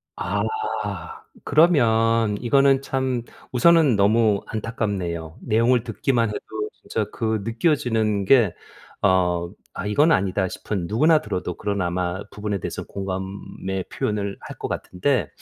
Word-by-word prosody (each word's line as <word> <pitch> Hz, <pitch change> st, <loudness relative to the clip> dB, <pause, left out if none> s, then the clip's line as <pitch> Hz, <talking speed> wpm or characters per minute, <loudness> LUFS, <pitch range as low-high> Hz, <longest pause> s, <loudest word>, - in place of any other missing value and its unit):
아. -, -, -1 dB, 1.0 s
그러면 115 Hz, -9 st, +3 dB
이거는 135 Hz, +2 st, +4 dB
참 130 Hz, -3 st, -1 dB, 0.3 s
우선은 145 Hz, -2 st, +5 dB
너무 105 Hz, 0 st, +3 dB
안타깝네요. 95 Hz, -7 st, -3 dB
내용을 115 Hz, +2 st, +2 dB
듣기만 120 Hz, -4 st, 0 dB
해도 105 Hz, -, -3 dB, 0.3 s
진짜 110 Hz, -, -3 dB
그 110 Hz, -2 st, -1 dB
느껴지는 115 Hz, -, +1 dB
게 115 Hz, -7 st, +5 dB, 0.5 s
어 90 Hz, -2 st, +2 dB, 0.2 s
'아. -, -, -5 dB
이건 145 Hz, +11 st, +3 dB
아니다.' 95 Hz, -, +1 dB
싶은 95 Hz, -1 st, -4 dB
누구나 155 Hz, -, +4 dB
들어도 90 Hz, -4 st, -4 dB
그런 100 Hz, -2 st, -2 dB
아마 90 Hz, +1 st, -1 dB
부분에 105 Hz, -2 st, -3 dB
대해서는 -, -, -5 dB
공감의 95 Hz, 0 st, -5 dB
표현을 100 Hz, -2 st, -2 dB
할 -, -, -10 dB
것 -, -, -4 dB
같은데 100 Hz, -, -1 dB
105 Hz, 275 characters per minute, -23 LUFS, 95-120 Hz, 1.0 s, 우선은